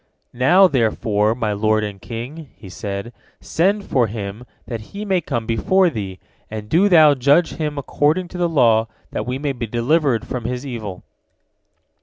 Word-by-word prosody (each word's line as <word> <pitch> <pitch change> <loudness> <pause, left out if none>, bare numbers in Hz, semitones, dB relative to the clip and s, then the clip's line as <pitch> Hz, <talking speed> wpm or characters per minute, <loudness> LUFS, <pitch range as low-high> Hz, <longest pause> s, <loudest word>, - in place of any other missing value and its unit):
"Now, 175 +11 +5
therefore, 110 - +1
my 110 -4 -1
lord 110 +1 +1
and 100 -2 -6
king," 130 +6 -7
he 95 - -12
said, 100 +4 -5 0.3
"send 200 +5 0
for 125 -4 +2
him 105 +2 -6 0.2
that 115 -3 -5 0.2
he 210 - -4
may 190 -3 +1
come 120 -7 -3
before 175 - +2
thee, 100 -7 -5 0.3
and 105 -1 -6
do 180 - +3
thou 155 -5 +7
judge 140 +6 +3
him 150 -2 -3
according 150 +5 0
to 180 - -7
the 175 -1 +1
law, 115 -7 +3 0.2
that - - -4
we 125 +1 -2
may 145 +1 -2
be 120 -3 -5
delivered 125 +2 +1
from 125 -3 -5
his 125 +3 -3
evil." 110 -8 -6
125 Hz, 170 wpm, -20 LUFS, 110-155 Hz, 0.3 s, thou